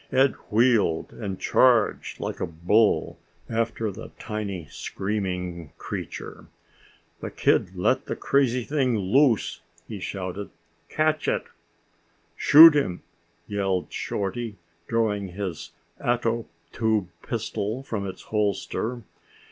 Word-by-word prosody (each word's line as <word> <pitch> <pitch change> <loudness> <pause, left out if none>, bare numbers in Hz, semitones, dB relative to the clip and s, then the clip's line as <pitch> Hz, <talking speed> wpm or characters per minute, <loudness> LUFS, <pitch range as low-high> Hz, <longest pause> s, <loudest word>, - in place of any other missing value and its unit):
Ed 135 +1 +4 0.2
wheeled 110 -7 +2
and 100 -4 -5
charged 120 -4 +3
like - - -4
a - - -1
bull 90 +7 +2 0.3
after 115 -1 -1
the - - -9
tiny 100 -6 -4
screaming 90 -6 -4
creature. - - -7 0.7
"The - - -5
kid 90 - +1
let 130 +9 +1
the - - -2
crazy 130 -3 +1
thing 130 -4 +1
loose!" 115 +5 +2 0.3
he - - -6
shouted. 95 +1 -5 0.4
"Catch 155 -1 +1
it!" - - +1 0.9
"Shoot 160 +2 +9
him!" 115 -12 0 0.4
yelled 95 -3 -2
Shorty, 105 +3 -3 0.3
drawing 105 -3 0
his 95 -6 -5 0.3
ato 115 -1 0 0.2
tube 110 -5 0
pistol 110 +6 -3
from 105 -6 -3
its 95 - -8
holster. 110 +3 -2
105 Hz, 110 wpm, -25 LUFS, 95-120 Hz, 0.9 s, Shoot